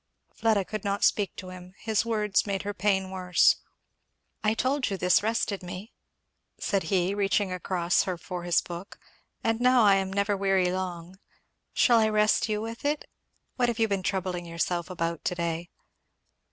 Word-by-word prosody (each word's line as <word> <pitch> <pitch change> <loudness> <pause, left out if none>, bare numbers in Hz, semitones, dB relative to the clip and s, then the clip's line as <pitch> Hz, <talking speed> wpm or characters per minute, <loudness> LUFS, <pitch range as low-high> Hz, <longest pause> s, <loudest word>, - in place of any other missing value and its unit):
Fleda 215 -4 +1
could 215 0 -5
not 200 -1 -1
speak 205 -3 +2
to 185 - -8
him; 185 0 -11
his 220 -2 0
words 210 -3 +1
made 195 -2 -2
her 205 0 -3
pain 190 -1 0
worse. 180 -2 +3 0.9
"I 215 +1 +2
told 265 +3 0
you 195 - -2
this 180 -1 +3
rested 215 -2 -1
me," 185 +5 -8 0.7
said 200 -1 0
he 190 -1 +1
reaching 200 -1 +1
across 180 -1 +1
her 185 -2 -2
for 180 +1 -6
his 175 0 +2
book; 175 +2 -8 0.5
"and 225 +1 0
now 250 -1 +5
I 200 -2 +6
am 190 0 -2
never 200 +1 +1
weary 195 -2 +2
long. 185 0 -5 0.6
Shall 240 -3 +5
I 220 -1 +3
rest 215 +1 +2
you 210 0 0
with 225 +1 -6
it? 295 +1 -1 0.5
What 245 -2 +2
have 235 - -2
you 225 -1 +3
been 200 -2 -1
troubling 180 -2 -2
yourself 170 +1 -2
about 170 -2 -3
to 180 - 0
day?" 170 0 -3
195 Hz, 175 wpm, -27 LUFS, 180-215 Hz, 0.9 s, I